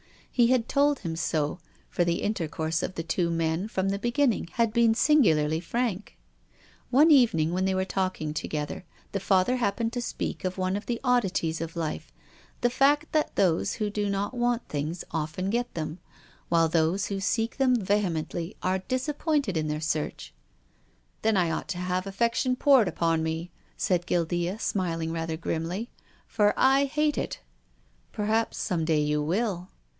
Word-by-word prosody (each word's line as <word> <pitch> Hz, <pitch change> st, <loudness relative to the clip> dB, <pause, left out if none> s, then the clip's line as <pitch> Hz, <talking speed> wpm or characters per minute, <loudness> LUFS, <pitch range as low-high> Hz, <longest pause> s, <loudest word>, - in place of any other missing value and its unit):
He 240 Hz, -2 st, +4 dB
had 245 Hz, -2 st, +2 dB
told 285 Hz, 0 st, +2 dB
him 165 Hz, -1 st, -4 dB
so, 160 Hz, 0 st, -1 dB, 0.3 s
for 175 Hz, -, 0 dB
the 170 Hz, 0 st, 0 dB
intercourse 165 Hz, -5 st, -1 dB
of 185 Hz, -, -4 dB
the 165 Hz, -, -3 dB
two 170 Hz, +1 st, 0 dB
men, 165 Hz, +3 st, 0 dB
from 195 Hz, -3 st, -1 dB
the 200 Hz, 0 st, -1 dB
beginning, 240 Hz, -2 st, +1 dB
had 230 Hz, -2 st, +1 dB
been 230 Hz, -1 st, +4 dB
singularly 160 Hz, -, +3 dB
frank. 210 Hz, +2 st, -3 dB, 0.7 s
One 300 Hz, +6 st, +5 dB
evening, 175 Hz, -, +4 dB
when 185 Hz, +1 st, 0 dB
they 190 Hz, 0 st, +1 dB
were 190 Hz, 0 st, 0 dB
talking 185 Hz, -6 st, -2 dB
together, 150 Hz, +2 st, -4 dB, 0.3 s
the 200 Hz, -, -2 dB
Father 190 Hz, +5 st, +2 dB
happened 230 Hz, 0 st, -1 dB
to 245 Hz, -, -2 dB
speak -, -, -4 dB
of 185 Hz, 0 st, -2 dB
one 185 Hz, 0 st, 0 dB
of 205 Hz, -, -5 dB
the 235 Hz, -1 st, -1 dB
od 250 Hz, -1 st, +3 dB
dities 165 Hz, -4 st, -2 dB
of 165 Hz, +1 st, -5 dB
life, 165 Hz, -2 st, -4 dB, 0.5 s
the 245 Hz, -, +3 dB
fact 290 Hz, +4 st, +3 dB
that 310 Hz, -1 st, 0 dB
those 175 Hz, -4 st, +2 dB
who 210 Hz, -2 st, -2 dB
do 205 Hz, 0 st, -1 dB
not 200 Hz, +4 st, -2 dB
want 240 Hz, -1 st, 0 dB
things 155 Hz, +4 st, -3 dB
often 160 Hz, +4 st, -2 dB
get 240 Hz, +1 st, -1 dB
them, 160 Hz, +1 st, -4 dB, 0.5 s
while 165 Hz, -1 st, +4 dB
those 165 Hz, +4 st, +1 dB
who 200 Hz, -1 st, -3 dB
seek 225 Hz, +3 st, -1 dB
them 260 Hz, -2 st, +3 dB
vehemently 185 Hz, -4 st, -1 dB
are 185 Hz, +1 st, +1 dB
disappointed 275 Hz, -, -1 dB
in 155 Hz, -1 st, 0 dB
their 150 Hz, 0 st, -2 dB
search. 155 Hz, -1 st, -3 dB, 0.4 s
" -, -, -39 dB
Then 220 Hz, -2 st, +3 dB
I 175 Hz, -3 st, +2 dB
ought -, -, -3 dB
to 185 Hz, -, -4 dB
have 180 Hz, +1 st, -2 dB
affection 235 Hz, +5 st, +1 dB
poured 265 Hz, -5 st, +5 dB
upon 165 Hz, -2 st, +1 dB
me," 160 Hz, +2 st, -3 dB, 0.3 s
said 175 Hz, -1 st, 0 dB
Guildea, 175 Hz, +2 st, 0 dB
smiling 165 Hz, -6 st, -2 dB
rather 165 Hz, -1 st, -3 dB
grimly. 170 Hz, +7 st, -3 dB, 0.2 s
" -, -, -31 dB
For 210 Hz, -2 st, +2 dB
I 270 Hz, +1 st, +4 dB
hate 300 Hz, +2 st, 0 dB
it." -, -, -4 dB, 0.4 s
" -, -, -38 dB
Perhaps 220 Hz, +1 st, 0 dB
some 170 Hz, -3 st, -1 dB
day 155 Hz, -2 st, +2 dB
you 150 Hz, 0 st, +1 dB
will." 185 Hz, +2 st, -1 dB
190 Hz, 175 wpm, -27 LUFS, 165-235 Hz, 0.7 s, One